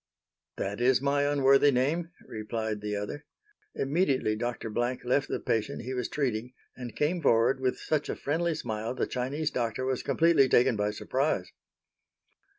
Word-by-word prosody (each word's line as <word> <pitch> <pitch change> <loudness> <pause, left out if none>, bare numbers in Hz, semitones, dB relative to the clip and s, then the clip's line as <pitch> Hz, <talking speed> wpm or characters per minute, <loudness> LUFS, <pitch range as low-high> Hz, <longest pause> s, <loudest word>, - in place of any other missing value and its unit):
"That 100 +4 -3
is 125 +1 +4
my 140 +1 +1
unworthy 140 0 +5
name," 145 +6 +1 0.2
replied 110 -1 -4
the 105 0 -3
other. 105 +9 -5 0.5
Immediately 135 - +1
Dr. 115 0 -4
Blank 120 +3 -1
left 130 +3 +2
the - - -2
patient 110 0 -2
he 130 +2 -4
was 125 -2 -2
treating, 125 -4 -2 0.2
and 125 -2 -8
came 165 +4 0
forward 120 +1 +3
with 130 -1 0
such 155 -2 -1
a - - -1
friendly 165 +3 -1
smile 110 0 -4
the - - 0
Chinese 140 +5 -2
doctor 120 +1 -2
was 130 -1 -1
completely 165 -5 +3
taken 125 0 +4
by 105 0 0
surprise. 130 +7 -1
130 Hz, 155 wpm, -29 LUFS, 115-145 Hz, 0.5 s, unworthy